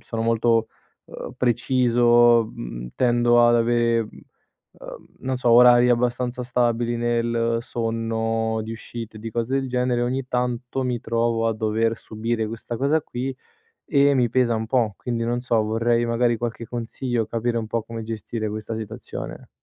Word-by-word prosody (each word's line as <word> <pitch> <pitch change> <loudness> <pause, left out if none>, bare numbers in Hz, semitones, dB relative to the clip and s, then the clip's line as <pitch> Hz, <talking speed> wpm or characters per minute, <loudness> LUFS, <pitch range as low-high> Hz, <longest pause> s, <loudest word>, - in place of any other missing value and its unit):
sono 115 -1 -4
molto, 115 0 +2 0.4
uhm, - - -8
preciso, 120 -2 +3
mhmm, - - -7
tendo 120 -1 +4
ad 120 - +4
avere, 115 0 +2
mhmm, 110 - -9 0.7
uhm, - - -10
non 130 0 -2
so, 125 -1 +1
orari 120 +1 +7
abbastanza 125 +1 0
stabili 120 -1 0
nel 115 0 0
sonno, 115 -1 -2
di 110 - -6
uscite, 115 -1 -8
di 115 +1 -6
cose 120 +3 -2
del 135 - -5
genere, 125 -1 0
ogni 130 +2 -2
tanto 125 +1 -2
mi 125 -2 -2
trovo 115 0 0
a 110 - -1
dover 110 +1 0
subire 110 0 -3
questa 115 +1 -6
cosa 140 +5 +2
qui 130 +1 -4 0.5
e 140 -1 +4
mi 125 -3 +2
pesa 120 -1 +2
un 110 0 -2
po', 115 -4 +1
quindi 120 -2 -3
non 120 +1 -1
so, 115 -3 +1
vorrei 115 +2 +1
magari 120 0 +1
qualche 115 0 -4
consiglio, 120 0 -3
capire 115 +1 -1
un 110 - -4
po' 115 +1 -2
come 115 +1 -7
gestire 110 0 -4
questa 110 +1 -5
situazione. 110 +1 -7
120 Hz, 160 wpm, -23 LUFS, 115-120 Hz, 0.7 s, orari